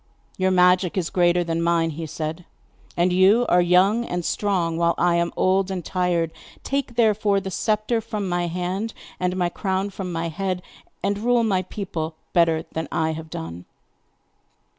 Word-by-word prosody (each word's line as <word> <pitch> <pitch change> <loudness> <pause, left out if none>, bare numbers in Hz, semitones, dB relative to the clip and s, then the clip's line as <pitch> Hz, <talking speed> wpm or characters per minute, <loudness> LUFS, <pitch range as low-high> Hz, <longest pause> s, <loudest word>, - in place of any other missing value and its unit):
'Your 185 0 +1
magic 180 0 +3
is 175 -3 -1
greater 175 -1 +3
than 165 0 -2
mine,' 170 -1 +2
he 160 +1 -6
said; 160 +3 -5 0.5
'and 175 +1 +2
you 195 +6 +5
are 180 - +4
young 185 +6 +4
and 175 -6 -3
strong, 180 -5 0
while 170 0 +2
I 175 0 +3
am 170 0 0
old 190 +1 +2
and 185 -3 -4
tired. 175 -3 0 0.3
Take, 275 -3 -2
therefore, 215 -3 +3
the 190 0 -6
sceptre 215 +4 0
from 215 -3 -4
my 175 -1 0
hand, 180 +6 -3 0.2
and 180 0 -1
my 175 -1 +1
crown 190 +2 -2
from 190 -2 -5
my 165 0 -2
head, 185 +2 -3 0.4
and 200 0 0
rule 240 +1 +2
my 195 -4 +1
people 170 -4 -5 0.2
better 165 -2 +3
than 160 -1 -3
I 160 0 0
have 160 0 -7
done. 85 - -7
180 Hz, 170 wpm, -23 LUFS, 170-195 Hz, 0.5 s, you